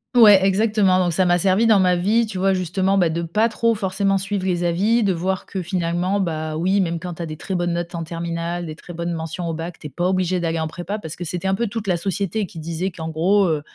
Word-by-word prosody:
Ouais 210 -5 +8
exactement, 200 -1 +3
donc, 175 -1 0
ça 185 +3 +2
m'a 175 0 +4
servi 190 +5 +3
dans 215 -3 +5
ma 180 -1 +3
vie, 210 +7 +2
tu 210 -4 -6
vois, 195 +1 +3
justement, 185 +2 0
bah, 175 -3 +3
de 165 +1 -2
pas 210 +8 +1
trop 230 +1 +1
forcément 195 -1 0
suivre 195 0 -2
les 175 -1 0
avis, 200 +7 +2
de 195 -2 +2
voir 185 +2 -2
que 190 - -4
finalement, 180 +2 -1
bah, 160 -4 -2
oui, 190 +4 +2
même 170 -2 -1
quand 175 0 -6
tu 170 - -8
as 170 - -3
des 155 0 -7
très 190 - -5
bonnes 175 -1 0
notes 170 +1 -3
en 170 -1 -3
terminale, 170 +1 -4
des 155 -1 -7
très 175 - -11
bonnes 170 +1 -3
mentions 165 +2 -4
au 165 - -2
bac, 165 +1 -6
tu 150 - -8
es - - -10
pas 175 +7 -1
obligé 185 -1 +1
d'aller 165 -1 -1
en 160 - -1
prépa, 175 +6 -5
parce 160 -6 -7
que 175 - -6
c'était 175 +2 -3
un 190 - +2
peu 235 +4 -1
toute 220 +1 -5
la 180 -2 +2
société 195 +3 -2
qui 180 - -14
disait 165 +3 -3
qu'en 160 -3 -6
gros, 185 +6 +2
heu, 155 -3 0
180 Hz, 270 wpm, -21 LUFS, 170-195 Hz, -, Ouais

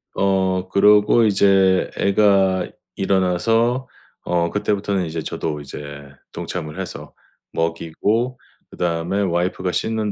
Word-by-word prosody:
어. 95 -1 +1
그러고 105 +4 +5
이제 95 -2 +3
애가 100 -2 +3 0.3
일어나서 115 +7 +1 0.4
어 85 -1 +1
그때부터는 100 -2 -1
이제 80 0 -4
저도 75 0 -4
이제 70 +1 -9 0.5
동참을 80 -4 -6
해서 - - -7 0.4
먹이고 85 +9 -1 0.3
그다음에 85 +3 -1
와이프가 90 0 -1
씻는 110 +1 -1
95 Hz, 250 characters per minute, -21 LUFS, 90-105 Hz, 0.5 s, 그러고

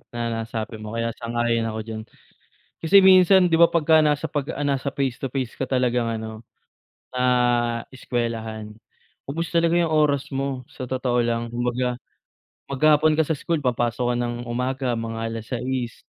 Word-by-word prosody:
na 120 0 -2
nasabi 110 0 -5
mo 110 +1 -7
kaya 115 0 -1
sang-ayon 115 -1 0
ako 110 0 -4
diyan. 110 0 -6 0.8
Kasi 165 +5 +6
minsan 190 -1 +7
'di 170 - +1
ba, 170 +1 +6
pagka 160 -1 +4
nasa 150 +1 +1
pag 145 -1 -3
ah, 145 +1 -3
nasa 140 0 -1
face 135 -3 -1
to 135 - -2
face 130 -2 -3
ka - - -5
talagang 125 -2 +1
ano, 110 0 -6 0.7
ah, 120 -2 +2
eskuwelahan 115 -4 -4 0.5
ubos 165 +4 -3
talaga 170 -1 +2
'yung 170 - +1
oras 150 -3 +2
mo, 135 -2 -3
sa - - -8
totoo 125 -1 0
lang, 115 0 -1
kumbaga 120 +1 -1 0.7
maghapon 155 +2 +3
ka 160 - +3
sa 160 - -1
school, 155 0 -2
papasok 120 0 0
ka - - -1
ng 120 0 -2
umaga 125 +2 -2
mga 115 -1 -4
6:00. 120 +2 -4
125 Hz, 160 wpm, -23 LUFS, 115-145 Hz, 0.8 s, minsan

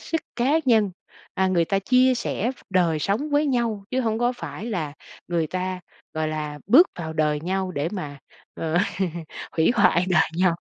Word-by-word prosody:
sức 325 - -2 0.2
cá 250 +4 +2
nhân, 220 -5 +3 0.4
à, 190 - +2
người 175 -3 +2
ta 195 +3 0
chia 255 +5 +4
sẻ 235 -1 -2
v - - -8 0.2
đời 175 -4 +2
sống 210 - -1
với 290 +1 +2
nhau 235 -6 0
chứ 260 - 0
hông 225 -3 0
có 240 +1 +2
phải 165 - -7
là 165 -10 -3 0.4
người 170 -2 0
ta, 185 +2 -3 0.3
gọi 155 0 -1
là, 150 -1 -4
bước 305 - +7
vào 160 -2 -4
đời 150 -1 +1
nhau 185 +3 -2
để 145 0 -1
mà, 145 -8 -5 0.4
ờ, 165 +2 -1 0.7
hủy 160 0 +3
hoại 175 -5 +4
đời 160 -3 +3
nhau 185 -2 +3
185 Hz, 185 wpm, -24 LUFS, 160-235 Hz, 0.7 s, bước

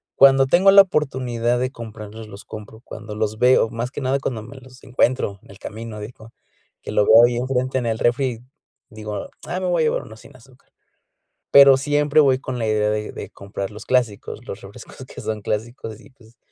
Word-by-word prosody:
Cuando 135 0 +6
tengo 180 +8 +5
la 200 0 +10
oportunidad 130 -8 -1
de 130 +1 -2
comprarlos, 110 -2 -9
los 100 -1 -11
compro, 110 +1 -10
cuando 110 -3 -9
los 110 0 -2
veo, 125 -2 +4
más 120 +3 -4
que - - -6
nada 135 +1 0
cuando 115 -5 -4
me 135 +4 -12
los 130 0 -16
encuentro 125 -5 0
en - - -16
el 100 - -14
camino, 110 -1 -8
digo, 110 +1 -11 0.5
que - - -7
lo 105 - +2
veo 115 +2 +7
ahí 120 0 -1
enfrente 130 +1 -1
en 125 - -2
el 110 -1 -1
refri, 125 -1 0 0.5
digo: 105 -3 -7 0.2
"Ah 185 +2 -3
me 185 - -1
voy 175 -2 +1
a - - +2
llevar - - 0
uno 110 0 -13
sin 130 - -17
azúcar". 130 +1 -21 0.8
Pero 140 -1 +8
siempre 145 +2 +1
voy 135 -3 +3
con 130 -2 -5
la 110 - -1
idea 105 0 +1
de 105 0 -3
de - - -8
comprar 100 0 -7
los 105 +2 -11
clásicos, 120 -5 -1
los - - -8
refrescos - - -12
que - - -10
son 110 -1 -4
clásicos 110 +1 -5
y, 135 - -18
pues, 115 -3 -22
120 Hz, 205 wpm, -21 LUFS, 110-135 Hz, 0.8 s, la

